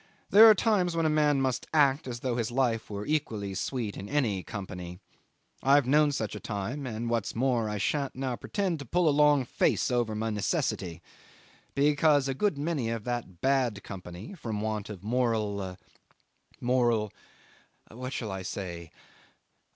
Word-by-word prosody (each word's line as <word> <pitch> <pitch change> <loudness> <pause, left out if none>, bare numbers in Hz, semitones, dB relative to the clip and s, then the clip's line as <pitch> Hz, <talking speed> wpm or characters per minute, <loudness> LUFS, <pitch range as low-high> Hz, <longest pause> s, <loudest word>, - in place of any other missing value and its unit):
There 220 +3 +10
are 215 - +8
times 190 -6 +1
when 165 -1 +1
a 155 - +3
man 150 -2 +3
must 130 -2 -1
act 140 -2 +3
as 120 -2 -5
though 130 -2 -1
life 120 0 0
were 100 0 -5
equally 110 -10 -2
sweet 110 +1 -3
in 100 +2 -7
any 115 -10 +1
company. 90 -4 -7 0.6
I've 140 0 +5
known 150 +3 +4
such 110 -6 -3
a - - -5
time, 115 +7 -4
and, 115 0 -4
what's 115 -2 -1
more, 120 -2 +1
I 105 - -2
shan't 140 +6 -1
now 130 -1 -2
pretend 185 - -2
to 140 - -7
pull 175 +7 +1
a - - +5
long 145 -2 +4
face 125 - +1
over 120 -3 0
my 110 +1 -1
necessity, 90 -4 -2 0.7
because 145 0 +3
a 135 - 0
good 160 +3 0
many 145 -5 -1
of 115 -2 -3
that 120 -8 -4
bad 130 -6 +1
company 90 - -8
from 115 - -4
want 110 -1 -3
of 100 -3 -8
moral 105 -5 -1 0.8
moral 120 -4 +1 0.8
what 125 +3 -6
shall 110 -6 -4
I 95 0 -4
say? 85 -3 -6
120 Hz, 165 wpm, -29 LUFS, 105-145 Hz, 0.8 s, There